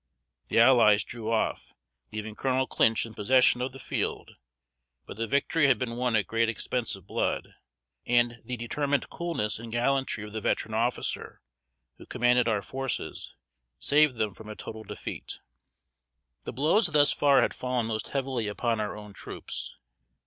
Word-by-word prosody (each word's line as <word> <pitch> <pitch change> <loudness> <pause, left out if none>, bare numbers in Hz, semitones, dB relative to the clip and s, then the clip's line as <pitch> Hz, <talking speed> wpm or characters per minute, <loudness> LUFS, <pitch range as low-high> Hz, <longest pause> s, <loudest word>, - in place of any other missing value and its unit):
The - - -1
allies 115 -4 +6
drew 115 -2 -5
off, 110 - -1 0.4
leaving 110 0 -5
Colonel 130 +3 0
Clinch 115 -3 +2
in 115 - -10
possession 125 +3 +4
of 130 +1 -2
the 135 - -11
field; - - -3 0.7
but - - -9
the 115 +2 -3
victory 140 +4 +2
had 130 -4 +4
been 115 -1 -3
won 125 -1 0
at 105 - +2
great 115 0 +1
expense 115 +1 -1
of 95 -2 -15
blood; - - -2 0.5
and 120 -1 +2
the 125 +2 -4
determined 140 +5 -1
coolness 165 -13 -2
and 115 0 -8
gallantry 130 -1 0
of 105 0 -9
the 110 - -3
veteran 110 - -1
officer 120 +3 -2 0.6
who - - -13
commanded 125 0 +3
our 105 -3 +1
forces, 135 -1 -4 0.4
saved 150 - +3
them 110 -3 -1
from 110 +3 -11
a 105 - -6
total 110 +1 -8
defeat. 100 - -6 1.1
The - - -4
blows 160 - +3
thus 150 -3 +5
far 140 -1 +4
had - - 0
fallen 125 -2 -1
most 110 -1 -3
heavily 130 -5 -2
upon 115 +2 -1
our 105 0 -3
own 105 -1 -10
troops. - - -7
120 Hz, 165 wpm, -28 LUFS, 110-130 Hz, 1.1 s, allies